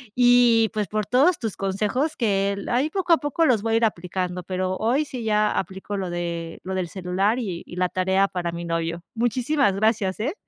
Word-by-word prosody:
y, 245 Hz, -2 st, +5 dB
pues, 210 Hz, -2 st, -1 dB
por 215 Hz, +2 st, -2 dB
todos 285 Hz, -, +3 dB
tus 220 Hz, -4 st, -4 dB
consejos 210 Hz, +10 st, -1 dB
que 200 Hz, -4 st, +1 dB
el 200 Hz, 0 st, -6 dB
ahí 255 Hz, +6 st, +1 dB
poco 360 Hz, 0 st, -1 dB
a 335 Hz, -, +7 dB
poco 290 Hz, +2 st, 0 dB
los 240 Hz, -8 st, +3 dB
voy 225 Hz, 0 st, 0 dB
a -, -, +5 dB
ir 230 Hz, -, 0 dB
aplicando, 180 Hz, -2 st, -3 dB
pero 185 Hz, +1 st, -2 dB
hoy 245 Hz, +7 st, +1 dB
sí, 255 Hz, -6 st, -7 dB
ya 210 Hz, -1 st, +2 dB
aplico 190 Hz, +2 st, -4 dB
lo 190 Hz, -2 st, -3 dB
de 170 Hz, -1 st, -4 dB
lo 190 Hz, -, -4 dB
del 185 Hz, -2 st, -1 dB
celular 190 Hz, +5 st, 0 dB
y 190 Hz, -9 st, -4 dB
y -, -, -10 dB
la 180 Hz, 0 st, 0 dB
tarea 190 Hz, +2 st, +1 dB
para 175 Hz, -2 st, -3 dB
mi 170 Hz, 0 st, -5 dB
novio. 165 Hz, 0 st, -2 dB
Muchísimas 240 Hz, 0 st, +1 dB
gracias, 205 Hz, -2 st, +1 dB
eh. 270 Hz, +9 st, -1 dB
205 Hz, 210 wpm, -24 LUFS, 185-240 Hz, -, a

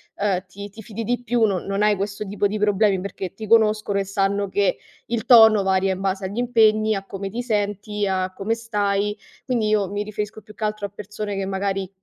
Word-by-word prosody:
ehm, 195 Hz, -2 st, 0 dB
ti 200 Hz, +3 st, -9 dB
ti 220 Hz, +3 st, -12 dB
fidi 220 Hz, +1 st, -6 dB
di 245 Hz, +1 st, -1 dB
più 240 Hz, -1 st, +1 dB
non 195 Hz, -4 st, -1 dB
non 195 Hz, +1 st, -1 dB
hai 210 Hz, 0 st, +4 dB
questo 205 Hz, +2 st, -4 dB
tipo 205 Hz, +1 st, -1 dB
di 210 Hz, +2 st, -3 dB
problemi, 205 Hz, -1 st, +2 dB
perché 190 Hz, -1 st, -6 dB
ti 215 Hz, +2 st, -8 dB
conoscono 215 Hz, -2 st, +3 dB
e -, -, 0 dB
sanno 195 Hz, 0 st, 0 dB
che 200 Hz, 0 st, +1 dB, 0.3 s
il 230 Hz, -1 st, -2 dB
tono 220 Hz, -4 st, +7 dB
varia 190 Hz, 0 st, +2 dB
in 185 Hz, -, -6 dB
base 190 Hz, 0 st, -1 dB
agli 200 Hz, +5 st, -4 dB
impegni, 220 Hz, -3 st, +3 dB
a 195 Hz, -1 st, -4 dB
come 195 Hz, 0 st, -5 dB
ti 235 Hz, +4 st, -4 dB
senti, 210 Hz, -2 st, -2 dB
a 185 Hz, -1 st, -1 dB
come 200 Hz, +4 st, -1 dB
stai, 210 Hz, -2 st, -1 dB, 0.3 s
quindi 235 Hz, -5 st, 0 dB
io 205 Hz, -3 st, +2 dB
mi 205 Hz, +1 st, -2 dB
riferisco 210 Hz, +1 st, -5 dB
più 215 Hz, +1 st, -15 dB
che -, -, -7 dB
altro 210 Hz, -1 st, -2 dB
a -, -, -20 dB
persone 205 Hz, 0 st, -6 dB
che 195 Hz, -, -2 dB
magari 195 Hz, 0 st, -2 dB
205 Hz, 220 wpm, -22 LUFS, 195-215 Hz, 0.3 s, tono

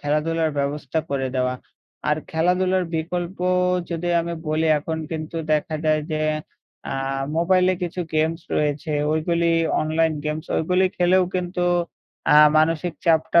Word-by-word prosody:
খেলাধুলার 155 Hz, +2 st, 0 dB
ব্যবস্থা 140 Hz, +1 st, -2 dB
করে 135 Hz, -1 st, -1 dB
দেওয়া। 125 Hz, 0 st, +1 dB, 0.5 s
আর 150 Hz, -, +3 dB
খেলাধুলার 180 Hz, +3 st, +1 dB
বিকল্প 175 Hz, +3 st, -3 dB, 0.5 s
যদি 170 Hz, +1 st, -2 dB
আমি 170 Hz, 0 st, -4 dB
বলি 155 Hz, +1 st, +1 dB
এখন 160 Hz, +2 st, -4 dB
কিন্তু 160 Hz, 0 st, -5 dB, 0.2 s
দেখা 155 Hz, +1 st, 0 dB
যায় 155 Hz, -1 st, +2 dB
যে, 155 Hz, -, -1 dB, 0.7 s
আ -, -, -2 dB, 0.4 s
মোবাইলে 185 Hz, +2 st, +3 dB
কিছু 175 Hz, +1 st, -3 dB
গেমস 160 Hz, +2 st, +1 dB, 0.2 s
রয়েছে। 150 Hz, +1 st, -1 dB, 0.2 s
ওইগুলি 170 Hz, +2 st, +1 dB, 0.3 s
অনলাইন 160 Hz, +1 st, +1 dB
গেমস 150 Hz, +1 st, -3 dB
ওইগুলি 180 Hz, +3 st, +2 dB
খেলেও 180 Hz, +1 st, +4 dB
কিন্তু 180 Hz, 0 st, -1 dB, 0.7 s
আ -, -, +8 dB, 0.2 s
মানসিক 165 Hz, +2 st, +1 dB
চাপটা 165 Hz, 0 st, +4 dB
160 Hz, 130 wpm, -22 LUFS, 155-175 Hz, 0.7 s, আ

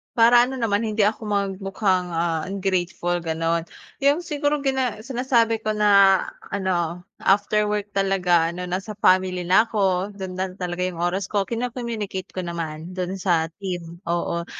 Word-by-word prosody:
Para 240 Hz, +1 st, +6 dB
ano 260 Hz, -, -5 dB
naman 220 Hz, -1 st, +1 dB
hindi 215 Hz, 0 st, 0 dB
ako 215 Hz, +2 st, +1 dB
mag 200 Hz, -2 st, 0 dB
mukhang, 190 Hz, -1 st, 0 dB
ah, 165 Hz, -1 st, 0 dB
ungrateful 185 Hz, -2 st, -1 dB
gano'n. 165 Hz, 0 st, -1 dB, 0.3 s
'Yong 285 Hz, +4 st, +2 dB
siguro 295 Hz, -2 st, -1 dB
gina 260 Hz, -5 st, -1 dB
sinasabi 235 Hz, -2 st, +1 dB
ko 215 Hz, -1 st, -2 dB
na 200 Hz, -2 st, +5 dB, 0.3 s
ano, 180 Hz, -3 st, -1 dB, 0.2 s
after 205 Hz, +2 st, +2 dB
work 210 Hz, 0 st, -2 dB
talaga 180 Hz, -4 st, +2 dB
ano 180 Hz, 0 st, -5 dB
nasa 195 Hz, +4 st, -3 dB
family 185 Hz, -3 st, +3 dB
na 185 Hz, +5 st, +4 dB
ako, 195 Hz, -2 st, 0 dB
don 190 Hz, -2 st, -7 dB
na 185 Hz, 0 st, -2 dB
talaga 180 Hz, -1 st, -3 dB
'yong 175 Hz, -2 st, -4 dB
oras 180 Hz, +3 st, 0 dB
ko, 200 Hz, 0 st, -1 dB
kino-communicate 230 Hz, -5 st, -4 dB
ko 185 Hz, -1 st, -5 dB
naman 165 Hz, 0 st, -5 dB
do'n 185 Hz, +1 st, -3 dB
sa 170 Hz, -4 st, +1 dB
team, 175 Hz, -4 st, -5 dB
oo. 170 Hz, 0 st, -1 dB
195 Hz, 155 wpm, -23 LUFS, 175-215 Hz, 0.3 s, Para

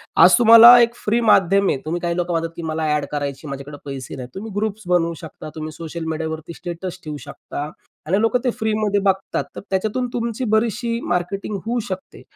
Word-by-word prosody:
आज -, -, +7 dB
तुम्हाला 235 Hz, +1 st, +10 dB
एक 235 Hz, 0 st, +2 dB
फ्री 225 Hz, +1 st, 0 dB
माध्यम 200 Hz, -3 st, +4 dB
आहे. -, -, +1 dB
तुम्ही 170 Hz, +2 st, -2 dB
काही 170 Hz, -1 st, -1 dB
लोकं 175 Hz, 0 st, -1 dB
म्हणतात 165 Hz, 0 st, -1 dB
की -, -, -5 dB
मला 160 Hz, 0 st, -2 dB
ॲड 150 Hz, -1 st, -1 dB
करायची, 145 Hz, 0 st, -4 dB
माझ्याकडे 140 Hz, +1 st, -7 dB
पैसे 135 Hz, -3 st, -6 dB
नाहीत. 125 Hz, -2 st, -8 dB
तुम्ही 215 Hz, +3 st, -6 dB
ग्रुप्स 210 Hz, -1 st, -3 dB
बनवू 170 Hz, -2 st, +2 dB
शकता, 160 Hz, -1 st, -9 dB
तुम्ही 155 Hz, 0 st, -5 dB
सोशल 165 Hz, +1 st, -6 dB
मीडियावरती 160 Hz, +1 st, -4 dB
स्टेटस 175 Hz, +2 st, -6 dB
ठेवू 150 Hz, -1 st, -5 dB
शकता 145 Hz, +1 st, -6 dB, 0.4 s
आणि 190 Hz, +5 st, +2 dB
लोकं 225 Hz, +2 st, +2 dB
ते 250 Hz, -, +1 dB
फ्री 220 Hz, -1 st, 0 dB
मध्ये 210 Hz, -1 st, +1 dB
बघतात 195 Hz, 0 st, -1 dB
त्याच्यातून 215 Hz, +6 st, -1 dB
तुमची 235 Hz, +1 st, -2 dB
बरीचशी 230 Hz, +1 st, 0 dB
मार्केटिंग 180 Hz, +4 st, -2 dB
होऊ 240 Hz, +2 st, -1 dB
शकते. 185 Hz, 0 st, -7 dB
185 Hz, 190 wpm, -21 LUFS, 160-220 Hz, 0.4 s, तुम्हाला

